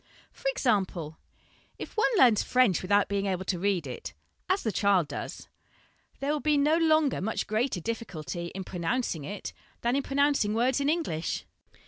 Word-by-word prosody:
For - - -6
example: 190 - -1 0.6
"If - - -8
one 435 - +3
learns 240 - +6
French 250 -8 +3
without 200 +2 +3
being 200 0 -1
able 190 -1 -2
to 185 -2 -1
read 190 -4 0
it 130 - -7 0.3
as 375 +2 +1
the 220 - 0
child 195 -5 +2
does - - -6 0.7
there 275 +2 -1
will 300 - 0
be 300 0 +2
no 295 +3 +4
longer 310 - +3
much 215 +3 -1
greater 215 -1 0
difficulty 170 -7 -5
in 190 - -4
pronouncing 180 - -2
it 200 +7 -6 0.3
than 240 +2 +1
in 280 - +2
pronouncing 275 -6 +1
words 250 +4 +2
in 280 - +1
English. 235 - -1
215 Hz, 165 wpm, -28 LUFS, 185-280 Hz, 0.7 s, learns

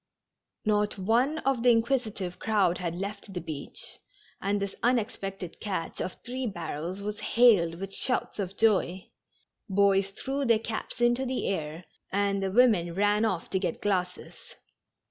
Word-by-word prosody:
Not 210 -1 +1
one 235 +10 +2
of 270 -3 +2
the 245 - +5
inquisitive 225 -6 +1
crowd 200 -5 +2
had 170 -2 -2
left 200 +1 -6
the - - -1
beach, 150 -4 -5 0.4
and 200 +1 0
this 200 -1 -3
unexpected 200 -7 -1
catch 190 -6 -3
of 185 - -3
three 250 +1 -3
barrels 175 0 -5
was 210 +1 -4
hailed 205 -9 +4
with 195 +2 -6
shouts 250 -2 -2
of 195 0 -3
joy. 190 -4 +2 0.6
Boys 195 0 +3
threw 270 +7 -3
their 230 -4 +4
caps 225 +2 -5
into 240 +2 +3
the 260 0 -2
air, 160 -2 -3 0.3
and 200 0 +1
the 195 - 0
women 195 -6 +4
ran 205 +2 +3
off* 185 -6 -1
to 190 - +1
get 180 -4 -2
glasses. 180 -3 -1
200 Hz, 150 wpm, -28 LUFS, 185-230 Hz, 0.6 s, the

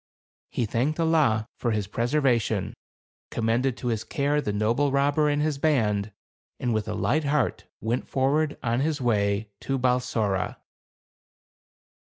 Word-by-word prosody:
He 120 - -1
thanked 130 +9 -1
Allah 150 -10 +2
for 120 - 0
his 105 -3 0
preservation, 120 +2 0 0.6
commended 115 +3 0
to 125 - -3
his 110 -2 -1
care 145 +1 0
the 105 - -2
noble 115 +7 +1
robber 145 +2 +2
and 145 0 +1
his 150 -3 -1
band, 110 -9 +1 0.5
and 120 -2 0
with 110 -1 -1
a 105 - -2
light 155 +1 +1
heart 140 -3 0 0.2
went 115 +3 -1
forward 145 +3 +1
on 120 0 +1
his 150 +1 0
way 105 -3 0
to 135 - -2
Balsora. 125 -6 0
125 Hz, 140 wpm, -26 LUFS, 110-145 Hz, 0.6 s, Allah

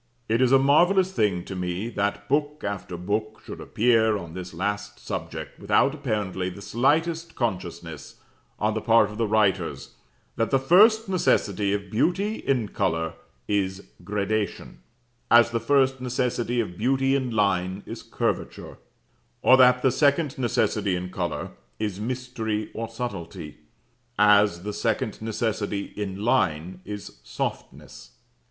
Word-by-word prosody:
It 115 +3 +1
is 130 -1 +4
a 135 - +8
marvellous 175 +8 +4
thing 100 - 0
to 95 - -6
me 90 +3 -3
that 105 -1 -2
book 145 +1 0
after 100 -3 -4
book 105 +4 -3
should - - -8
appear 110 -2 +2
on 85 -4 -8
this 90 0 -7
last 105 +4 -3
subject, - - -6
without 140 - +2
apparently 105 -10 -2
the 95 - -10
slightest 160 - 0
consciousness 85 - -4 0.4
on 105 +1 0
the 110 - -2
part 115 -2 +4
of 105 - -9
the 115 - +1
writers 105 -2 0 0.4
that 115 - +1
the 135 - +3
first 210 - +5
necessity 105 - +1
of 100 -1 -3
beauty 195 - +1
in 125 -7 0
colour 80 -4 -1 0.3
is 100 -1 -2
gradation, 105 0 -2 0.5
as 120 0 +6
the 115 - 0
first 130 +2 +2
necessity 125 -1 -1
of 100 -6 -3
beauty 135 +3 +2
in 130 -2 -1
line 100 -3 0
is - - -7
curvature, - - -3 0.6
or 130 - +7
that 125 -1 +5
the 130 - +4
second 140 +2 +2
necessity 105 -5 +1
in 90 +1 -5
colour 85 -3 -3 0.3
is 105 -3 -3
mystery 115 -2 -3
or 115 0 -4
subtlety, 95 -9 -6 0.6
as 105 -4 +4
the 105 +1 -4
second - - -2
necessity 105 -2 -2
in 100 0 -4
line 90 -7 0
is 105 -11 -8
softness. - - -6
110 Hz, 140 wpm, -25 LUFS, 100-130 Hz, 0.6 s, a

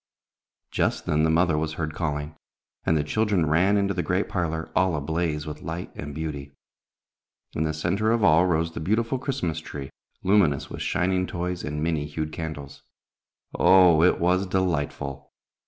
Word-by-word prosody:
Just - - 0
then 75 0 +1
the 80 - +3
mother 80 -1 +3
was 80 0 -2
heard 80 -1 -3
calling, 75 -1 -3 0.5
and 80 - +3
the 75 - +1
children 100 +1 +1
ran 90 +7 +3
into 100 -1 +1
the 90 - -1
great 90 +5 0
parlor, 80 -3 -2
all 90 -3 +3
ablaze 75 +1 -2
with 75 -1 -7
light 85 +1 -5
and 75 -1 -7
beauty. 70 -3 -5 1.0
In 80 - -1
the 80 - -1
center 95 +7 0
of 115 -2 +1
all 80 +1 +5
rose 85 -1 +1
the - - -5
beautiful 115 - 0
Christmas 105 - -2
tree, 70 -3 -8 0.3
luminous 95 -8 +2
with - - -6
shining 90 +1 0
toys 90 0 -3
and 75 0 -3
many 80 -3 -1
hued 75 +1 -4
candles. 75 -3 -7 0.7
Oh, 90 -4 +6
it 90 - +4
was 90 +3 +2
delightful! 70 -7 -2
80 Hz, 165 wpm, -25 LUFS, 75-90 Hz, 1.0 s, Oh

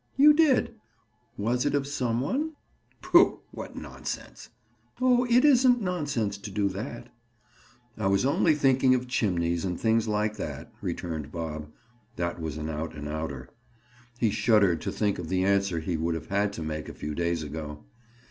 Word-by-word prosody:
"You 295 +2 +8
did. 295 -6 +3 0.6
Was 120 +4 0
it 145 0 +1
of 140 -1 0
some 125 -4 -1
one?" 295 - -1 0.5
"Pooh! - - +5
What - - -8
nonsense!" - - -7 0.5
"Oh, 250 -1 +4
it 245 +3 +5
isn't 255 -3 +5
nonsense 145 - -2
to 105 - -7
do 100 0 0
that." 100 +5 -6 0.9
"I 100 - +1
was 100 +5 +2
only 150 +3 +3
thinking 135 -2 +4
of 125 0 -2
chimneys 85 -8 0
and 90 -2 -2
things 115 0 +2
like 105 0 0
that," - - -6
returned 80 -4 -4
Bob. 75 -2 -5 0.4
That 85 -1 -3
was 80 -1 -4
an 75 0 -4
out 80 +1 -4
and 75 0 -6
outer. 75 -4 -5 0.7
He 115 -3 +2
shuddered 100 -9 +3
to - - -3
think 105 -3 0
of 85 -2 -5
the 95 +1 +1
answer 100 -3 +2
he 80 +1 -2
would 80 +1 -1
have 80 - -7
had 100 +1 +1
to 85 - -5
make 75 0 -4
a - - -9
few 75 - -5
days 85 0 -1
ago. 75 0 -7
100 Hz, 170 wpm, -27 LUFS, 80-130 Hz, 0.9 s, You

